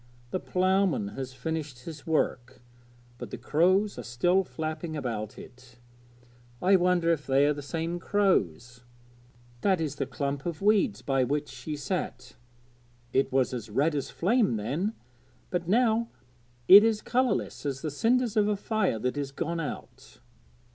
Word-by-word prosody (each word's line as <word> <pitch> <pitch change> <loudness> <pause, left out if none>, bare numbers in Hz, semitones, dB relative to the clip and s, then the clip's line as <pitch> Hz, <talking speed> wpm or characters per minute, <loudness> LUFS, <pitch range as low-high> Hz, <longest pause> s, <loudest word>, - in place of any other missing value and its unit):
'The 185 - -1
ploughman 185 - +1
has 130 +4 -6
finished 140 -1 -5
his 160 -2 -9
work, 125 -6 -1 0.6
but - - -7
the - - -6
crows 185 +6 +2
are - - -5
still 175 +11 +2
flapping 155 -1 -5
about 110 -6 -4
it. 125 -1 -14 0.8
I 190 +2 +4
wonder 175 -2 +2
if 150 -3 -2
they 135 +1 +4
are 150 - +3
the 145 - -7
same 165 +4 -3
crows! 125 - 0 0.8
That 190 -3 +2
is 150 -3 -3
the 135 - -2
clump 140 0 -3
of 170 -2 -4
weeds 210 +3 +2
by 135 -2 +1
which 145 +3 -1
she 155 - -6
sat; 145 -3 -4 0.8
it 135 - +2
was 130 -1 +1
as 115 -3 -5
red 145 +9 +1
as 140 -2 -2
flame 210 - +1
then, 145 - -2 0.6
but 175 -2 -2
now 230 +2 +2 0.6
it 200 +3 +11
is 220 -1 +1
colourless 255 0 0
as 140 -2 -3
the 155 - -2
cinders 235 - +1
of 210 -1 +3
a 210 - +1
fire 210 - 0
that 125 +5 -2
is 140 -2 -3
gone 165 +4 -3
out.' - - -7
155 Hz, 155 wpm, -28 LUFS, 135-190 Hz, 0.8 s, it